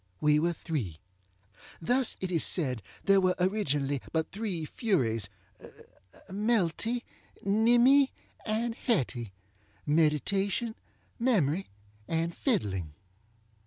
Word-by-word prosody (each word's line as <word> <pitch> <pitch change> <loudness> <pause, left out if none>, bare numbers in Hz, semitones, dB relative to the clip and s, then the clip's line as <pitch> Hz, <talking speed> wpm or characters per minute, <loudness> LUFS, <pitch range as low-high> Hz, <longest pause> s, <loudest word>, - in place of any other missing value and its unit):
We 150 0 +4
were 170 +2 +1
three. 125 - -4 0.8
Thus 250 +8 +1
it 185 -1 -2
is 165 -3 +3
said 130 - +2 0.2
there 195 -1 +5
were 185 -1 +2
originally 145 - 0
but 160 -1 -1
three 195 -6 -3
FuriesŌĆöMelty, 185 - -2 0.4
Nimmy, 240 +7 +5 0.3
and 225 +2 -1
HettyŌĆöMeditation, 150 - -1 0.5
Memory, 195 - +1 0.4
and 165 +1 -1
Fiddling. 95 - -1
170 Hz, 85 wpm, -29 LUFS, 135-215 Hz, 0.8 s, there